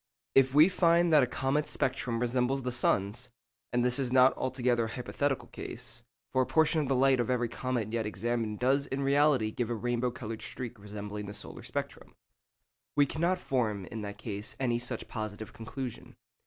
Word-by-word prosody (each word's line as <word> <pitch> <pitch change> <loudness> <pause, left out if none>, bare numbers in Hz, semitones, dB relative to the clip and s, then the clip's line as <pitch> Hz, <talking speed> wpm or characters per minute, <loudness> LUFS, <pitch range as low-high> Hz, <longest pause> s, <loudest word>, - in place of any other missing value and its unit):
If 135 0 +4
we 155 +3 +8
find 170 -2 +3
that 150 - +8
a 125 - +2
comet's 135 +4 0
spectrum 125 -3 -1
resembles 125 +2 +1
the 125 - -1
sun's—and 120 +2 -1
this 125 +2 +2
is 130 -3 -1
not 130 0 +6
altogether 125 -2 0
a - - -5
hypothetical 130 +3 -2
case, - - -7 0.3
for 130 - +4
a - - +2
portion 160 0 +3
of 145 - -2
the 135 - +2
light 135 0 +4
of 120 - 0
every 120 -1 +1
comet 115 -2 -3
yet 115 -2 0
examined 115 -1 -2
does 135 +4 +2
in 135 +1 -2
reality 140 -5 +3
give 120 +1 -2
a 120 - -1
rainbow 120 +2 0
coloured 115 -2 -6
streak 120 0 -6
resembling 105 0 -6
the 100 - -6
solar - - -6
spectrum—we 145 -1 -5
cannot 170 +6 0
form, 110 - -1
in 110 - -5
that 100 -1 -6
case, 105 -1 -5
any 120 -3 +1
such 120 -1 -3
positive 110 -1 -6
conclusion. 125 +2 -7
125 Hz, 180 wpm, -30 LUFS, 115-135 Hz, 0.3 s, we